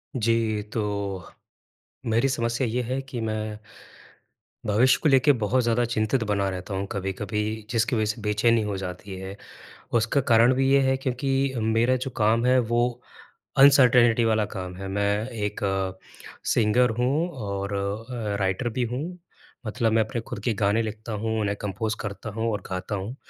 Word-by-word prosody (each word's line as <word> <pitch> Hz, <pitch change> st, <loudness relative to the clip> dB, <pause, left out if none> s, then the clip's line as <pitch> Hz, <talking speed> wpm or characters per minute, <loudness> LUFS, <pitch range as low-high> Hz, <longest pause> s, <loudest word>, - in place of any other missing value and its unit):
जी। 115 Hz, -2 st, +1 dB
तो 110 Hz, -, 0 dB, 1.3 s
मेरी 115 Hz, +4 st, +2 dB
समस्या 120 Hz, 0 st, 0 dB
ये 125 Hz, +2 st, -1 dB
है 130 Hz, +3 st, -2 dB
कि 135 Hz, -3 st, -6 dB
मैं 110 Hz, -1 st, -3 dB, 1.1 s
भविष्य 110 Hz, +5 st, +4 dB
को 155 Hz, -, +4 dB
लेके 135 Hz, +1 st, +5 dB
बहुत 125 Hz, +1 st, +1 dB
ज़्यादा 120 Hz, +1 st, +2 dB
चिंतित 110 Hz, +3 st, +1 dB
बना 100 Hz, -2 st, 0 dB
रहता 95 Hz, +2 st, -5 dB
हूँ 95 Hz, +1 st, -2 dB
कभी-कभी 100 Hz, +2 st, -3 dB, 0.3 s
जिसकी 115 Hz, 0 st, +1 dB
वज़ह 110 Hz, -, +2 dB
से 115 Hz, -, -12 dB
बेचैनी 110 Hz, +2 st, +2 dB
हो 105 Hz, -2 st, -2 dB
जाती 95 Hz, +1 st, -6 dB
है। 95 Hz, +1 st, -7 dB, 0.6 s
उसका 115 Hz, +5 st, +1 dB
कारण 115 Hz, +3 st, +6 dB
भी 135 Hz, +1 st, +2 dB
ये 140 Hz, -, +6 dB
है 130 Hz, -, +3 dB
क्योंकि 135 Hz, +1 st, -1 dB
मेरा 115 Hz, +3 st, +2 dB
जो 130 Hz, +1 st, -4 dB
काम 115 Hz, +2 st, +2 dB
है 130 Hz, +1 st, +5 dB
वो 120 Hz, -1 st, +1 dB, 0.8 s
अनसर्टेनिटी 125 Hz, -4 st, +6 dB
वाला 110 Hz, -1 st, +2 dB
काम 90 Hz, -1 st, -5 dB
है। 95 Hz, +1 st, -6 dB
मैं 100 Hz, +3 st, 0 dB
एक 105 Hz, -3 st, -4 dB
अ, 95 Hz, -1 st, -1 dB, 0.5 s
सिंगर 120 Hz, +3 st, +3 dB
हूँ 145 Hz, +8 st, +1 dB
और 100 Hz, -7 st, -4 dB
अ, 105 Hz, +2 st, -3 dB
राइटर 95 Hz, +5 st, 0 dB
भी 125 Hz, +2 st, -1 dB
हूँ। 145 Hz, +10 st, -4 dB, 0.5 s
मतलब 110 Hz, +1 st, 0 dB
मैं 110 Hz, 0 st, +4 dB
अपने 120 Hz, +1 st, -4 dB
खुद 110 Hz, -, -7 dB
के 120 Hz, -, +1 dB
गाने 105 Hz, +3 st, +3 dB
लिखता 110 Hz, +1 st, -6 dB
हूँ 110 Hz, +1 st, -2 dB
उन्हें 100 Hz, -1 st, -1 dB
कम्पोज़ 105 Hz, +2 st, -2 dB
करता 105 Hz, +2 st, -6 dB
हूँ 115 Hz, 0 st, 0 dB
और 105 Hz, -2 st, -3 dB
गाता 95 Hz, +2 st, -3 dB
हूँ। 100 Hz, +6 st, -5 dB
110 Hz, 165 wpm, -25 LUFS, 105-125 Hz, 1.3 s, कारण